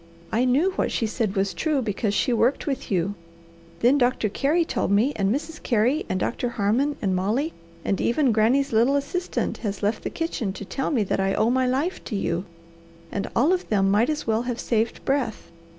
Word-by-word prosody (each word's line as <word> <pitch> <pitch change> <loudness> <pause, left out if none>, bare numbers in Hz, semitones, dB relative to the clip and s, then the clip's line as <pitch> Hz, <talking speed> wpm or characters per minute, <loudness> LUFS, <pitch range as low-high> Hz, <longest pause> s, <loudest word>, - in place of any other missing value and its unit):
I 240 +3 +2
knew 285 +10 +3
what 375 - -1
she 230 - 0
said 215 -2 -2
was 195 0 0
true, 310 -3 0
because 210 -3 -1
she 245 - +2
worked 235 +4 +2
with 275 -4 -3
you. 190 0 0 0.7
Then 255 +5 +4
Doctor 245 -3 +2
Carey 300 - +1
told - - -1
me, 220 +8 +3
and 195 -1 +1
Mrs. 310 +5 -3
Carey, 245 +6 +1
and 185 - 0
Doctor 245 +5 -1
Harmon, 235 +7 +1
and 190 -2 +1
Molly, 225 - 0 0.3
and 195 - 0
even 260 +1 +2
Granny's 245 +6 +2
little 235 +5 +4
assistant 350 +6 -2
has 205 -2 -4
left 210 +2 0
the - - -2
kitchen 245 - -3
to 200 - -7
tell 270 +7 -2
me 245 -8 +2
that 195 - -1
I 195 0 +1
owe 225 - +2
my 260 0 +2
life 280 +9 -1
to 220 - -4
you, 180 -2 -1 0.7
and 200 0 -3
all 290 +10 +4
of 370 - -2
them 195 -2 +2
might 215 +7 +3
as 300 -1 -2
well 220 0 +1
have 245 -1 -3
saved 225 -1 -1
breath. 270 -5 -1
235 Hz, 205 wpm, -24 LUFS, 205-280 Hz, 0.7 s, Then